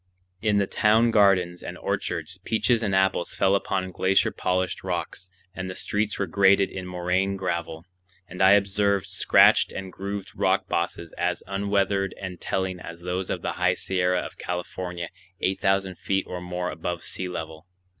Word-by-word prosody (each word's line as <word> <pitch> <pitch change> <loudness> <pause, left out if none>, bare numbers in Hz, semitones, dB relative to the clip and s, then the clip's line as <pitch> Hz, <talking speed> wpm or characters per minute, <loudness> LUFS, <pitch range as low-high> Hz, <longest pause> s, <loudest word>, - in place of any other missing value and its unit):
In 105 -2 +2
the 100 - +3
town 110 +4 +3
gardens 95 -5 +3
and - - -7
orchards, 85 +2 -3
peaches 115 +3 +1
and 100 -4 0
apples 95 -2 +1
fell 95 0 +3
upon 95 -1 0
glacier 95 +2 +2
polished 90 0 -1
rocks, 90 - -4 0.2
and 95 -1 -5
the 90 - -6
streets 105 0 -1
were 100 - 0
graded 95 +2 +4
in 95 -1 -6
moraine 90 +2 0
gravel; 85 -3 -3 0.4
and 90 - -7
I 95 +1 +7
observed 100 -1 +2
scratched - - +5
and 95 -1 -7
grooved 100 0 -5
rock - - +1
bosses 85 -1 -2
as 90 0 -1
unweathered 100 -1 0
and 90 -2 -7
telling 95 -1 -2
as 85 0 -9
those 90 +1 -3
of - - -3
the - - -1
High - - +3
Sierra 90 -1 0
of - - -9
California 90 -1 -4 0.3
eight 95 +1 0
thousand 95 -1 +1
feet 95 0 0
or 90 -1 -5
more 90 0 -3
above 85 +1 -4
sea 95 -1 -3
level. 80 -1 -7
95 Hz, 165 wpm, -25 LUFS, 90-100 Hz, 0.4 s, I